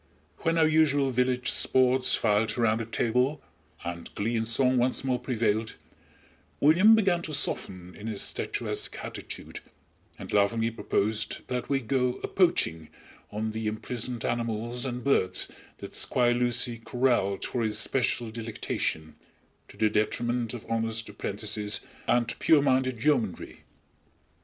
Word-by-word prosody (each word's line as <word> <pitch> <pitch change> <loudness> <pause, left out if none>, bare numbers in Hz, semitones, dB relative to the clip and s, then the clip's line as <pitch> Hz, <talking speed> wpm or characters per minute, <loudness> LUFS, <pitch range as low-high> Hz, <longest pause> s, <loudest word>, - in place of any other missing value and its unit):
When 165 0 0
our 160 - +5
usual 145 -4 +3
village 125 0 +1
sports 130 0 +4
filed 105 +2 +1
around 115 -2 +2
the 115 - -3
table, 125 +6 0 0.5
and 85 0 -5
glee 115 +4 -1
and 115 0 -1
song 125 +2 +2
once 125 +2 +1
more 130 -2 0
prevailed, 115 -3 -1 0.8
William 185 +10 +6
began 190 -5 +2
to 155 -3 -4
soften 90 -9 -2
in 105 - -8
his 105 -3 -1
statuesque - - -2
attitude, - - -7 0.6
and - - -9
laughingly 110 +3 +2
proposed 110 -1 -1
that 125 -1 -3
we 135 -1 +1
"go 125 +1 0
a - - -1
poaching" 125 - +1 0.4
on 110 +1 -3
the 110 0 -4
imprisoned 115 +2 -3
animals 120 +1 -2
and 125 -1 -5
birds 135 -9 +2 0.3
that - - -9
Squire 120 -1 +2
Lucy 120 -1 +1
corraled 120 -5 0
for 125 - -2
his 110 -2 0
special 120 0 0
delectation, 110 -8 -3 0.5
to - - -16
the 110 - +3
detriment 115 +3 -1
of 120 - -9
honest 115 -1 -2
apprentices 105 +1 0 0.3
and 120 -1 +2
pure 150 -3 +4
minded 130 -4 +1
yeomanry. 125 -11 -1
120 Hz, 140 wpm, -27 LUFS, 110-130 Hz, 0.8 s, William